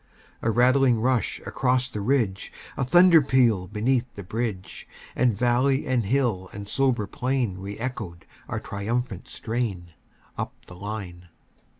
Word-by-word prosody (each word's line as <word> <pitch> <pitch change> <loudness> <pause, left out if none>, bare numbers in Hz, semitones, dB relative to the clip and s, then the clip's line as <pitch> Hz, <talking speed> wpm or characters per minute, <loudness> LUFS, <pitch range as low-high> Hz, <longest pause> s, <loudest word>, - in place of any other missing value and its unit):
A 115 - 0
rattling 125 +1 +4
rush 125 -2 0
across 125 -1 +1
the 105 -5 -5
ridge, 110 -5 0 0.2
A - - -1
thunder 170 +4 +7
peal 120 -9 +2
beneath 120 +4 0
the 100 - -7
bridge; 100 -2 -4 0.3
And 120 -5 +2
valley 125 +3 +2
and 125 -4 +1
hill 110 -6 0
and 100 0 -7
sober 125 -2 +1
plain 125 -4 -1
Re 100 +1 -6
echoed 110 -8 -5 0.2
our - - -3
triumphant 105 0 -3
strain, 105 -7 -3 0.5
Up - - -3
the 90 - -12
line. 90 -3 -7
115 Hz, 135 wpm, -25 LUFS, 100-130 Hz, 0.5 s, thunder